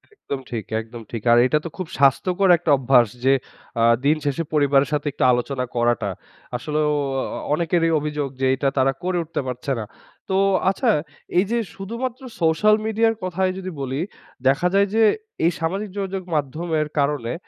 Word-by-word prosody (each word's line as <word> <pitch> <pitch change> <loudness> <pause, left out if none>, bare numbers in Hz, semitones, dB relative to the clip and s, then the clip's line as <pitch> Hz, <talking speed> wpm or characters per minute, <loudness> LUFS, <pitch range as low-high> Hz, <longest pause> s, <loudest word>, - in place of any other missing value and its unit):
একদম 140 - -5
ঠিক, 115 -4 -3 0.2
একদম 115 +1 -10
ঠিক। 115 - -4
আর 120 - +6
এইটা 150 +4 +2
তো - - -3
খুব 185 -4 -4
স্বাস্থ্যকর 180 +8 +3
একটা 165 -2 0
অভ্যাস 125 -2 +4 0.2
যে 135 - +6 0.5
আ - - +4 0.2
দিন 150 - +5
শেষে 145 +4 0
পরিবারের 140 -2 +3
সাথে 150 0 -1
একটু - - -2
আলোচনা 125 +1 -1
করাটা। 120 -3 +1 0.5
আসলেও 150 +4 -1 0.3
অ - - -1 0.3
অনেকেরই 165 +1 +1
অভিযোগ 150 -1 -2
যে 130 - +3
এটা 135 +1 +1
তারা 135 0 +4
করে 180 0 0
উঠতে 160 - -3
পারছে 125 +2 -4
না। 110 - -4 0.4
তো 190 - +1 0.3
আচ্ছা, 235 +6 +1 0.5
এই 185 - +4
যে 235 - +2 0.2
শুধুমাত্র 235 +6 -5 0.2
সোশ্যাল 165 +7 +4
মিডিয়ার 225 +1 +2
কথাই 185 +1 0
যদি 185 0 -5
বলি 135 +2 -2 0.5
দেখা 140 +7 +3
যায় 200 +1 +4
যে 225 - +5 0.4
এই 170 - +4
সামাজিক 195 +6 -2
যোগাযোগ 195 -1 -3
মাধ্যমের 155 +2 -1
কারনে 140 -5 0
150 Hz, 170 wpm, -22 LUFS, 135-185 Hz, 0.5 s, আর